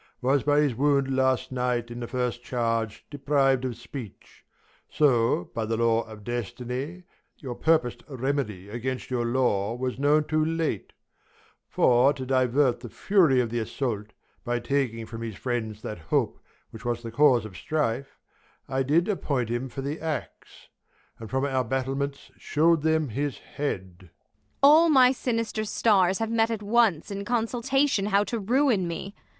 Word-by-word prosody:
Was 135 +2 +2
by 145 +2 +3
his 145 -4 +1
wound 140 +1 +1
last 130 -1 +1
night 125 -2 -1
in 120 - -6
the 120 - -5
first 125 -1 -2
charge 115 -3 -2
Depriv'd 135 -2 +2
of 125 -3 -4
speech; 120 -8 -10 0.5
so, 120 - +2
by 115 - -2
the 110 +1 -1
law 115 0 +2
of 110 -2 -11
destiny, 125 - -5 0.3
Your 130 -5 -6
purpos'd 155 -3 +1
remedy 130 -8 -2
against 125 +4 -4
your 120 -2 0
law 115 -4 +1
Was 125 +1 -3
known 150 +2 +3
too 155 0 0
late: 160 - -2 0.8
for, 125 +3 +4
to 130 -2 -6
divert 130 0 +2
The 120 -1 -9
fury 160 - +3
of 115 -2 -3
th' 120 0 -1
assault, 110 -3 -3 0.4
by 120 0 -1
taking 120 -3 -1
from 115 0 -8
His 115 -3 -5
friends 110 -3 -3
that 105 - -5
hope 80 - -1 0.3
which 115 +1 -11
was 120 -1 -2
the 115 - -6
cause 125 -3 +4
of 100 -4 -10
strife, 140 -2 -2 0.5
I 135 0 -1
did 155 +7 +2
appoint 140 - -1
him 120 +3 -2
for 135 - -6
the 145 +4 -4
axe; 160 -2 -6 0.5
and 110 -2 -8
from 135 +1 0
Our 130 -2 0
battlements 135 +3 -3
shew'd 165 +1 +2
them 160 -2 +1
his 140 +5 -2
head. 95 -11 -5
Ang. - - -20 0.5
All 315 +4 +7
my 260 -4 +6
sinister 230 -4 -2
stars 195 -3 +2
have 225 0 -2
met 225 0 +2
at 220 -2 -3
once 210 -6 +2
In 200 0 -4
consultation 240 +1 +1
how 200 0 +3
to 230 +2 -3
ruin 230 -3 +2
me. 180 +4 -5
135 Hz, 165 wpm, -26 LUFS, 120-160 Hz, 0.8 s, All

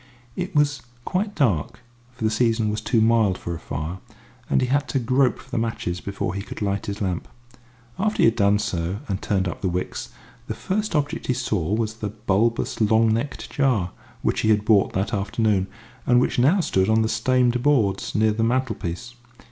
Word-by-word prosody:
It 185 0 -4
was 145 -2 +2 0.2
quite 200 +3 -1
dark, 115 - 0 0.3
for 125 - -7
the 110 - +2
season 115 -1 +2
was 105 - -3
too 115 -3 +2
mild 110 -4 +3
for 85 - -5
a 80 - -6
fire, 80 +6 -5 0.5
and - - +3
he 130 - +2
had 140 +3 +1
to - - 0
grope 130 +1 +2
for - - -16
the - - 0
matches 110 -6 -2
before 100 -2 -3
he 100 - -3
could - - -8
light 100 -1 -2
his 100 +1 -3
lamp. 90 -3 -2 0.7
After 215 +2 0
he - - +7
had 115 - +4
done 100 -2 +3
so 95 -3 -2
and 95 -1 -2
turned 95 -2 0
up 85 - -5
the 95 - 0
wicks, 90 +1 -3 0.4
the - - -3
first 210 -1 -2
object 145 -1 -1
he 125 - +1
saw 105 -8 -1
was 110 -1 -1
the 105 -2 -3
bulbous, 110 +3 0
long 110 +1 +4
necked 130 +5 -3
jar 120 -11 +1 0.3
which - - +1
he 110 - +1
had 105 -1 +3
bought 105 -3 +4
that 95 +3 -1
afternoon, 100 -1 +1 0.4
and 120 0 +5
which 125 - +1
now 155 +10 +4
stood 95 - +1
on 110 0 +4
the - - +1
stained 125 +2 +2
boards 120 -9 +1
near 110 +1 +3
the 110 +2 -1
mantelpiece. 120 -3 -2
110 Hz, 200 wpm, -23 LUFS, 100-125 Hz, 0.7 s, he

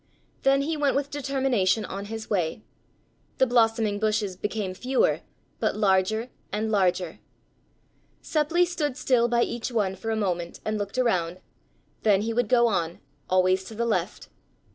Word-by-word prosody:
Then 275 0 +3
he 320 +3 -1
went 290 -2 +1
with 280 +1 -1
determination 265 -8 +1
on 195 +1 -6
his 220 +1 -6
way. 180 -1 -1 0.7
The 260 - +5
blossoming 225 -4 +2
bushes 215 -3 0
became 205 0 -3
fewer, 255 +7 +1 0.4
but - - 0
larger 215 +4 +2 0.2
and 215 +1 -1
larger. 185 -4 +1 1.0
Seppli 320 +3 +2
stood 300 -6 -2
still 240 -4 +3
by 235 0 +2
each 235 +1 -3
one 205 -5 0
for 225 - -5
a 220 - +1
moment 175 -5 -2
and 215 0 -1
looked 205 +3 -4
around, 185 -8 +1 0.6
then 205 -2 +3
he 230 +1 -1
would 240 -2 0
go 240 -1 +5
on, 175 -7 0 0.3
always 185 0 +3
to 220 - -9
the 235 +2 -1
left. 205 -4 -2
220 Hz, 155 wpm, -26 LUFS, 190-250 Hz, 1.0 s, The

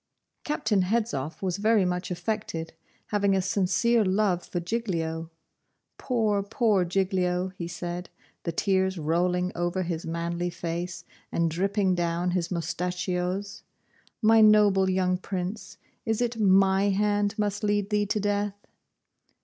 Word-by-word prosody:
Captain 215 -9 +1
Hedzoff 185 - -1
was 180 -2 -1
very 215 -1 +3
much 180 0 -2
affected, 175 -3 -3 0.4
having 200 -2 +2
a - - +2
sincere 200 +5 +2
love 190 -2 +1
for 175 - -4
Giglio. 170 -5 -2 0.7
'Poor, 220 -5 +1
poor 205 -1 +2
Giglio!' 180 0 0
he 170 -2 -5
said, 175 +1 -5 0.3
the 170 - -3
tears 190 +2 +1
rolling 180 +3 0
over 175 +2 -1
his 170 -2 -3
manly 170 +1 -2
face, 170 +1 -4 0.3
and 165 -1 +1
dripping 195 +2 +1
down 175 0 0
his 175 -1 -1
moustachios; 180 +3 -2 0.6
'my 225 +1 +6
noble 205 -3 +5
young 185 -1 +1
Prince, 190 +2 -5 0.3
is 220 -1 -1
it 240 -1 -1
my 195 0 +4
hand 205 +1 +1
must 205 0 -1
lead 205 0 0
thee 210 0 +1
to 210 - 0
death? 205 0 0
190 Hz, 130 wpm, -27 LUFS, 175-205 Hz, 0.7 s, my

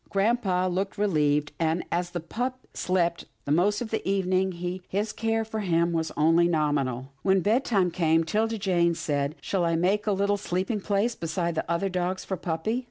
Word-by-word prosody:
Grampa 195 -3 +1
looked 190 +3 -2
relieved, 150 -7 +1
and, 165 +1 +1
as 175 +1 0
the 175 - -4
pup 245 +10 -3 0.2
slept 175 -2 0 0.2
the 140 - -2
most 195 +8 +2
of 230 - -4
the 220 - 0
evening, 190 -1 +1 0.4
his 210 +3 -1
care 225 0 0
of 220 0 -8
him 170 -5 +1
was 160 -1 -1
only 165 +3 +4
nominal. 140 -5 0
When 190 -1 +3
bedtime 205 -3 +2
came, 165 -1 +2
'Tilda 220 +6 0
Jane 175 -4 +2
said, 145 -1 -1
" - - -29
Shall 190 -3 -1
I 165 -1 +2
make 195 +6 +1
up 210 - +3
a - - -2
little 200 +1 +2
sleeping 195 +3 -2
place 205 +4 +1
beside 170 0 -2
the 160 - -3
other 170 +3 +1
dogs 185 0 -2
for 190 - -2
puppy? 175 +7 -2
180 Hz, 190 wpm, -27 LUFS, 165-205 Hz, 0.4 s, only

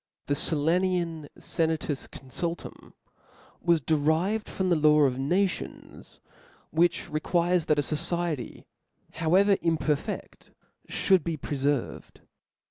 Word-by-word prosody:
The 145 - 0
Sillanian 165 +1 0
Senatus 160 -4 -2
Confultum 165 +6 -6 0.7
was 170 -1 +3
derived 160 +8 0
from 185 -1 -1
the - - +5
law 150 -1 +5
of 130 -3 +2
nations, 180 +7 -2 0.5
which 170 +2 +2
requires 170 +2 +1
that 150 - +2
a 145 - +2
fociety, 155 0 -3 0.5
however 190 +5 +3
imperfcft, 160 -3 -2 0.4
fhould 190 -4 +3
be 165 -2 -2
preferved. 140 -2 -2
160 Hz, 100 wpm, -27 LUFS, 150-175 Hz, 0.7 s, the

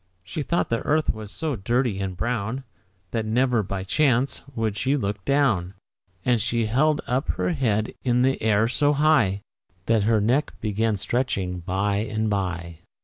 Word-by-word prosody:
She 100 +11 -5
thought 170 +4 0
the 115 - +1
earth 155 +1 +1
was 110 -2 -8
so 155 +6 -2
dirty 120 0 0
and 95 -2 -3
brown, 120 +4 -2 0.5
That 115 - -1
never, 120 +2 +2
by 95 -1 -4
chance, 130 +4 +2
would 110 -3 -1
she 130 +7 +1
look 100 -5 -3
down; 110 -11 +1 0.5
And 120 -3 +3
she 115 +1 0
held 145 +7 +2
up 130 +5 -1
her - - -1
head 110 -9 0
in 125 -1 +2
the 135 +1 +1
air 110 0 +3
so 145 +5 +2
high 140 -10 +3 0.4
That 115 -2 +3
her 110 -2 +4
neck 125 +8 +1
began 110 0 0
stretching 100 -4 -1
by 100 +4 -1
and 110 0 -1
by. 85 -4 -3
110 Hz, 165 wpm, -24 LUFS, 100-130 Hz, 0.5 s, her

